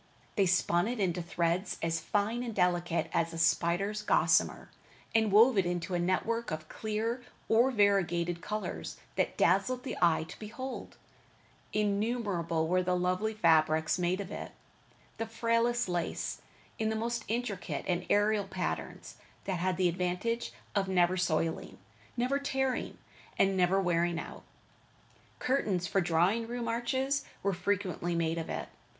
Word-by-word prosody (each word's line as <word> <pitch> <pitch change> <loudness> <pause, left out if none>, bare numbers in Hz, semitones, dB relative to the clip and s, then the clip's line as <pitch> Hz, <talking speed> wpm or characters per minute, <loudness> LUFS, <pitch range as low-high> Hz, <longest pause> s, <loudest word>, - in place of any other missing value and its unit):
They 195 -2 +3
spun 175 0 +2
it 245 0 -3
into 180 -3 0
threads 170 +2 -1
as 165 0 0
fine 210 +8 0
and 235 -3 -4
delicate 175 -2 +1
as 165 0 +1
a - - -5
spider's 175 +5 +1
gossamer, 210 - +2 0.4
and 220 -2 +3
wove 220 +2 +6
it 190 - +2
into 175 +1 -2
a 175 - +1
network 225 +6 0
of 155 0 -5
clear 220 +5 -2 0.3
or 235 +4 +4
variegated 175 -6 +2
colors 215 +3 -4 0.2
that - - 0
dazzled 250 -1 +2
the 265 - -4
eye 170 -2 +4
to 160 - -11
behold. 245 +5 -7 0.7
Innumerable 205 -6 0
were 185 +2 +2
the 180 0 +1
lovely 185 +5 0
fabrics 160 -3 +3
made 180 +2 +1
of 200 -1 -5
it. - - -6 0.7
The 225 - -2
frailest 230 +1 +1
lace, 175 -2 -2 0.4
in 220 0 +1
the 220 - -1
most 230 +1 -2
intricate 225 -4 -3
and 180 -1 0
aerial 205 -1 +3
patterns, 190 -2 -4 0.3
that 185 -3 -2
had 185 0 0
the 185 -1 +3
advantage 180 +7 -1 0.2
of 200 -2 +1
never 180 -1 +3
soiling, 165 -2 -1 0.4
never 255 +4 +1
tearing, 265 -2 -1 0.4
and 195 0 +3
never 185 +1 +3
wearing 175 -2 +1
out. - - -8 1.0
Curtains 205 -9 0
for 195 +1 +1
drawing 175 +7 +2
room 240 0 -4
arches 260 +4 0 0.2
were 200 0 +1
frequently 180 -2 -1
made 165 0 0
of 165 - -5
it. - - -3
195 Hz, 145 wpm, -31 LUFS, 175-225 Hz, 1.0 s, wove